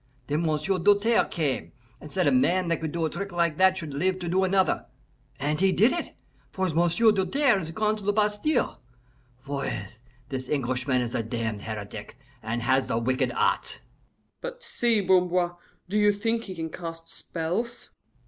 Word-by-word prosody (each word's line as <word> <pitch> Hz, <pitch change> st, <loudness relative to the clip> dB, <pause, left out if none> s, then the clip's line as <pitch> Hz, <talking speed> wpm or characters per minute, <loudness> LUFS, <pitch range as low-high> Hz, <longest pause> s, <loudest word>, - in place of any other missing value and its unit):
Then 150 Hz, +4 st, 0 dB
M'sieu' 160 Hz, +5 st, 0 dB
Doltaire 205 Hz, +5 st, +4 dB
came, 150 Hz, -6 st, -2 dB, 0.3 s
and 150 Hz, -, -11 dB
said 185 Hz, -2 st, +1 dB
a -, -, +4 dB
man 185 Hz, -9 st, +3 dB
that 165 Hz, -, 0 dB
could 160 Hz, -2 st, -2 dB
do 170 Hz, 0 st, -1 dB
a -, -, 0 dB
trick 200 Hz, 0 st, -5 dB
like 170 Hz, -3 st, +1 dB
that 190 Hz, 0 st, +5 dB
should 160 Hz, -6 st, -5 dB
live 185 Hz, +6 st, +1 dB
to 180 Hz, -2 st, -5 dB
do 185 Hz, +3 st, +2 dB
another. 190 Hz, 0 st, +2 dB, 0.5 s
And 150 Hz, +2 st, 0 dB
he 190 Hz, 0 st, +4 dB
did 220 Hz, +7 st, +4 dB
it, 345 Hz, -, -4 dB, 0.3 s
for 190 Hz, -1 st, -1 dB
M'sieu' 175 Hz, +7 st, +4 dB
Doltaire 210 Hz, +4 st, +2 dB
is 160 Hz, -3 st, -5 dB
gone 215 Hz, +5 st, 0 dB
to 210 Hz, -, -10 dB
the 205 Hz, -, +2 dB
Bastile. 210 Hz, +7 st, +1 dB, 0.6 s
Voyez, 120 Hz, -7 st, -4 dB, 0.3 s
this 130 Hz, -1 st, -4 dB
Englishman 130 Hz, -2 st, 0 dB
is 120 Hz, 0 st, -5 dB
a 115 Hz, -, 0 dB
damned 110 Hz, -2 st, -3 dB
heretic, 105 Hz, -1 st, -7 dB, 0.2 s
and 115 Hz, +2 st, -3 dB
has 130 Hz, +2 st, +2 dB
the -, -, 0 dB
wicked 130 Hz, +3 st, 0 dB
arts." -, -, 0 dB, 0.6 s
"But -, -, -7 dB
see, 235 Hz, -, +1 dB
Bamboir, 180 Hz, -2 st, +2 dB, 0.3 s
do 210 Hz, +4 st, 0 dB
you 210 Hz, 0 st, +5 dB
think 225 Hz, +3 st, -1 dB
he 185 Hz, -, -7 dB
can 160 Hz, -1 st, -4 dB
cast 165 Hz, -1 st, -7 dB
spells?" 180 Hz, +9 st, -4 dB
175 Hz, 175 wpm, -26 LUFS, 145-205 Hz, 0.6 s, that